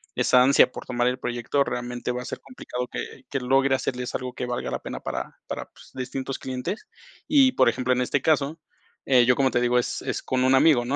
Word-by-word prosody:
esa 125 - +4
ansia 135 -1 +5
por - - -8
tomar 120 -1 0
el 125 0 0
proyecto, 125 +3 0
realmente 120 -1 -4
va 125 0 -3
a - - -11
ser - - -5
complicado 125 - -6
que 130 - -7
que 140 - -1
logre 135 +2 +3
hacerles 125 -1 -3
algo 125 0 -3
que 125 - -4
valga 120 0 -3
la - - -2
pena - - -6
para - - -5
para - - -5
pues, - - -18
distintos 130 +1 -4
clientes. 130 - -5 0.4
Y, 275 -3 +5
por 130 - +4
ejemplo, 125 +2 0
en 125 - 0
este 130 +2 0
caso, 155 0 +1 0.5
eh, 125 -2 +6
yo, 125 +1 +4
como 135 -1 +3
te 120 - +1
digo, 125 0 +3
es 120 - -3
es - - -3
con 130 -1 0
un 130 +1 +4
amigo, 135 -3 +5
¿no? 135 +3 -1
130 Hz, 230 wpm, -25 LUFS, 125-135 Hz, 0.5 s, eh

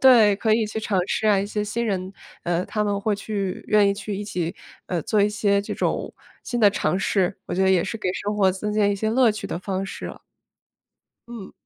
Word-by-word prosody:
对， 225 -6 +7
可 215 +1 +2
以 225 0 +2
去 215 - -4
尝 210 -3 0
试 220 - 0
啊， 205 -2 +5
一 195 - 0
些 210 0 -2
新 235 +3 -2
人， 190 -3 -2 0.3
呃， 175 +1 0
他 210 -1 -1
们 200 -1 -1
会 205 0 0
去 200 -2 -4
愿 210 -1 +4
意 - - +3
去 200 0 -5
一 205 - -4
起， 175 -3 -3 0.3
呃， 175 -3 -2
做 210 +5 +1
一 205 - +4
些 205 -1 +1
这 200 - -5
种 - - -1 0.3
新 240 -1 -2
的 205 -2 +7
尝 185 - 0
试。 195 -2 +1
我 - - -3
觉 190 - +1
得 190 - +4
也 180 -3 +4
是 225 - -4
给 185 - -2
生 205 +2 -3
活 195 -2 +4
增 210 +3 -3
添 210 -1 +3
一 - - 0
些 215 +2 -1
乐 240 -2 +4
趣 215 - -7
的 - - -4
方 190 0 -3
式 - - -6
啊。 - - -9 1.1
嗯。 230 -5 -9
205 Hz, 255 characters per minute, -23 LUFS, 195-215 Hz, 1.1 s, 对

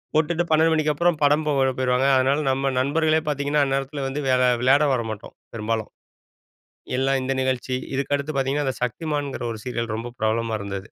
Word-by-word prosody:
போட்டுட்டு 160 +2 +1
12 160 +1 +4
மணிக்கு 155 -1 +1
அப்புறம் 170 -1 +1
படம் 150 +2 +3
போட 135 -2 +2
போயிருவாங்க. 130 +1 +2
அதனால 135 +3 +2
நம்ம 135 +1 0
நண்பர்களே 155 +3 +2
பாத்திங்கன்னா 145 +1 +1
அந்த 135 0 0
நேரத்தில 135 0 -4
வந்து 140 +2 -3
வேற 130 0 +3 0.2
விளயாட 140 +4 +4
வரமாட்டோம் 110 -3 -5 0.2
பெரும்பாலும். 110 0 -2 1.1
எல்லாம் 135 0 +1
இந்த 135 +1 -1
நிகழ்ச்சி, 130 0 -1 0.2
இதுக்கு 140 +1 -1
அடுத்து 140 +2 -4
பாத்தீங்கன்னா 135 +1 0
அந்த 130 - -1
சக்திமான்ங்கிற 145 +1 -3
ஒரு 110 - -6
சீரியல் 115 -3 -3
ரொம்ப 120 +1 -6
பிரபலமா 110 0 0
இருந்தது. 100 -1 -4
135 Hz, 170 wpm, -23 LUFS, 125-150 Hz, 1.1 s, 12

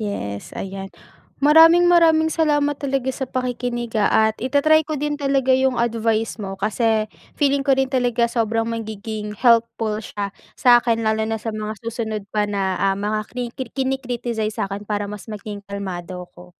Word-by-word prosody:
Yes, 100 - -5
ayan. 195 0 -6 0.5
Maraming 325 +4 +7
maraming 325 -2 +4
salamat 295 -2 +2
talaga 270 -2 -1
sa 260 0 -5
pakikinig, 245 -2 -3
ah, 205 - +3 0.2
at - - -32
ita-try 285 +5 +4
ko 310 - -2
din 295 +1 -2
talaga 275 -2 +2
yung 260 -1 +2
advice 225 -1 0
mo. 195 -1 -5
Kasi 215 +2 +1 0.3
feeling 280 -1 +2
ko 275 -1 +2
din 265 0 0
talaga 245 -2 +2
sobrang 225 -1 0
magiging 220 -2 -5
helpful 230 -2 +2
siya 205 -2 -5 0.2
sa 245 -2 +6
'kin. 230 -2 0
Lalo 220 0 +1
na 225 - -1
sa 220 +1 -5
mga 215 0 -4
susunod 220 -2 -3
pa 210 -1 0
na, 195 -2 -1
ah, 195 0 +2
mga 210 +2 -1
kriki 245 0 -5
kini-criticize 245 -5 -2
sa'kin 200 +1 -4
para 205 -1 -1
mas 210 +2 -9
maging 210 -1 -7
kalmado 185 -2 -5
ako. 175 0 -16
230 Hz, 165 wpm, -21 LUFS, 210-265 Hz, 0.5 s, Maraming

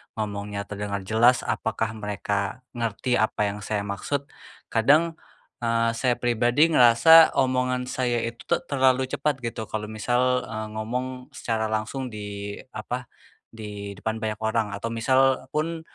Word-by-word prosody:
ngomongnya 105 -1 -4
terdengar 100 -1 -4
jelas, 115 +5 +4
apakah 110 -1 -1
mereka 105 +2 -3
ngerti 120 +1 -1
apa 110 -1 0
yang 105 - -7
saya 105 0 -2
maksud. 100 +8 -3 0.5
Kadang, 155 +8 +3 0.4
eee, 115 -1 +1
saya 120 +2 +1
pribadi 120 +7 +2
ngerasa 155 +6 +7
omongan 125 -1 +1
saya 125 -2 -1
itu 115 0 -6
te - - +3
terlalu 130 -1 +2
cepat 150 -1 0
gitu 115 -2 -4
kalau 105 0 -4
misal, 125 +3 +1
eee, 110 -1 -5
ngomong 115 +4 -3 0.3
secara 110 -1 -1
langsung 110 +5 -3
di 105 -2 -6 0.2
apa, 125 +4 -4 0.4
di 105 -2 -8
depan 110 +3 -3
banyak 110 -1 -3
orang 110 0 +1
atau 115 +3 -4
misal 130 +3 +2
pun 165 +2 -1
115 Hz, 140 wpm, -25 LUFS, 105-125 Hz, 0.5 s, ngerasa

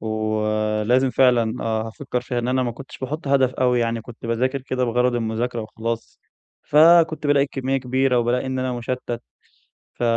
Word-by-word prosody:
ولازم 110 +3 0
فعلًا 125 -3 +2
آه، 110 0 -1
هافكّر 125 +2 -4
فيها 125 0 -3
إن 120 +1 -2
أنا 130 0 +1
ما 120 -2 -2
كنتش 135 +3 -11
باحُط 145 +3 -5
هدف 135 -2 +3
أوي، 125 -1 +2
يعني 115 0 -1
كنت 115 +1 -11
باذاكر 130 +4 0
كده 130 -1 -1
بغرض 125 +1 +1
المذاكرة 115 +1 -2
وخلاص. 115 +1 -5 0.4
فكنت 160 0 +5
بالاقي 145 -1 +4
الكمّية 135 -1 -2
كبيرة 130 0 +1
وبالاقي 120 +2 0
إن 130 0 -2
أنا 130 -1 -1
مُشتّت. 120 0 -4 0.7
ف - - -8
125 Hz, 165 wpm, -22 LUFS, 115-130 Hz, 0.7 s, فكنت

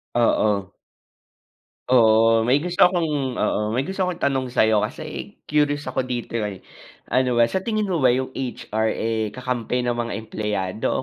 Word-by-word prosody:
Oo. 105 -4 +2 1.2
Oo, 115 -2 +5
may 130 +3 +4
gusto 180 +1 -4
akong 175 -2 0 0.3
oo, - - +1 0.2
may 130 - +1
gusto 190 +7 -5
akong 180 - -1
itanong 135 -2 +1
sa - - +4
'yo 110 -1 +3
kasi - - -8 0.2
curious 145 -1 +2
ako 130 - -2
dito, 120 -2 -3
eh. 105 -4 -4 0.5
Ano 125 -1 +2
ba, 120 - +4
sa - - 0
tingin 215 +1 -2
mo 175 - +1
ba 130 - +3
'yong 130 +1 -2
HR, 110 -3 -2
eh, 110 -2 -2
kakampi 125 -1 -2
ng 120 -1 -1
mga 120 0 -2
empleyado 105 0 -2
120 Hz, 165 wpm, -22 LUFS, 110-140 Hz, 1.2 s, Oo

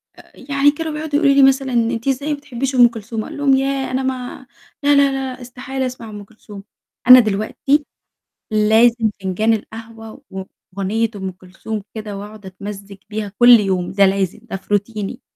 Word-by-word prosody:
آآ، - - -18
يعني 280 +1 +2
كانوا 320 +2 -5
بيقعدوا 300 -1 -4
يقولوا 280 -3 +4
لي 275 - +6
مثلًا: 270 -1 +3
"أنتِ 230 +1 0
إزاي 275 +3 -1
ما - - -4
بتحبيش 270 -1 -4
أم 245 -1 +7
كلثوم؟" 225 -1 -6
أقول - - -9
لهم: 280 -2 +3
"ياه! 270 -1 -1
أنا 260 +1 -1
ما 260 0 -5 0.4
لأ، 290 0 +4
لأ، 280 -1 +4
لأ، 265 -1 -4
استحالة 260 +2 -5
أسمع 250 -3 -7
أم 205 -1 -9
كلثوم." 205 -1 -13 0.4
أنا 255 0 +11
دلوقتي 225 +7 0 0.7
لازم 220 +2 +3
فنجان 215 +4 +1
القهوة 225 +1 -8
وأغنية 195 +3 -4
أم 190 -2 -5
كلثوم 190 +3 -8
كده، 210 -2 -6
وأقعد 210 0 -10
أتمزج 200 +1 -9
بيها 210 -2 -4
كلّ 240 -1 +8
يوم، 185 -3 -1
ده 200 +1 +4
لازم، 195 +1 0
ده 235 - -7
في 195 +2 -6
روتيني. 205 0 -2
225 Hz, 170 wpm, -19 LUFS, 205-265 Hz, 0.7 s, أنا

